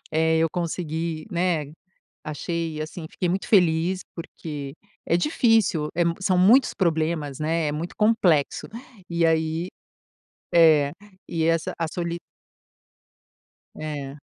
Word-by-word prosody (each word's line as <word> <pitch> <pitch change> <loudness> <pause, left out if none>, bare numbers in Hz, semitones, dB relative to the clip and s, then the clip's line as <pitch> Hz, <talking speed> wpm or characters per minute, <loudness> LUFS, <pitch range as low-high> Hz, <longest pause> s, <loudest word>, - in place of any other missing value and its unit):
Eh, 160 +1 +2
eu 165 0 +3
consegui, 165 -2 -3
né. 175 -3 0 0.6
Achei, 160 +1 -3
assim 160 +1 -7
fiquei 180 - -2
muito 190 +2 -1
feliz, 180 -1 +3
porque 150 -4 -7 0.3
é 170 - +3
difícil. 220 - +2
É 175 +1 +2
mu 170 0 +1
são 190 -1 +2
muitos 225 +9 +5
problemas, 160 -5 0
né, 160 0 0
é - - -2
muito 160 +4 -5
complexo. 190 -9 +2 0.4
E 170 0 +1
aí 160 +1 0 0.9
É 155 -4 +6 0.4
e 165 -2 -1
essa 165 0 +1
a 165 - 0
soli 170 -1 -3 1.6
É. 145 -2 -6
165 Hz, 120 wpm, -24 LUFS, 155-175 Hz, 1.6 s, É